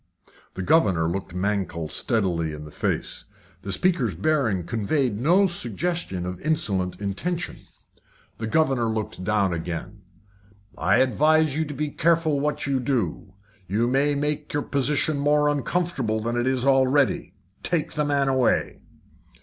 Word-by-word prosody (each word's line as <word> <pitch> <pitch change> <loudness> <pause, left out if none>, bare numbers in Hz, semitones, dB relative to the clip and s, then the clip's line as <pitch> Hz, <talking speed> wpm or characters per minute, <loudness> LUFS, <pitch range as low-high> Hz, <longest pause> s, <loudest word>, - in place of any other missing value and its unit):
The 95 - -4
governor 95 - +3
looked 90 +1 -4
Mankell 95 -4 -1
steadily 85 - 0
in 75 0 -8
the 75 - -11
face. - - -2 0.4
The 100 - -5
speaker's 135 - +1
bearing 110 - +1
conveyed 115 - -1
no 180 +8 +4
suggestion 165 - -2
of 90 0 -5
insolent 100 - -1
intention. 165 - -3 0.8
The 110 - -3
governor 130 -2 +2
looked 110 -4 -4
down 100 -1 +1
again. 85 0 -5 0.7
"I 95 +4 +2
advise 150 +3 +3
you 160 +1 0
to 145 -1 -7
be 150 +1 -2
careful 160 -1 +2
what 150 +1 -1
you 140 -2 0
do. 120 -6 -2 0.3
You 105 +5 +1
may 140 +3 +2
make 150 +1 -2
your 145 - 0
position 145 +2 0
more 150 +1 +3
uncomfortable 145 -5 0
than 115 +2 -2
it 120 +1 0
is 130 -1 +1
already. 135 0 +2 0.3
Take 165 -3 -1
the 150 - 0
man 140 -1 +1
away." 130 -2 +1
130 Hz, 140 wpm, -24 LUFS, 100-150 Hz, 0.8 s, no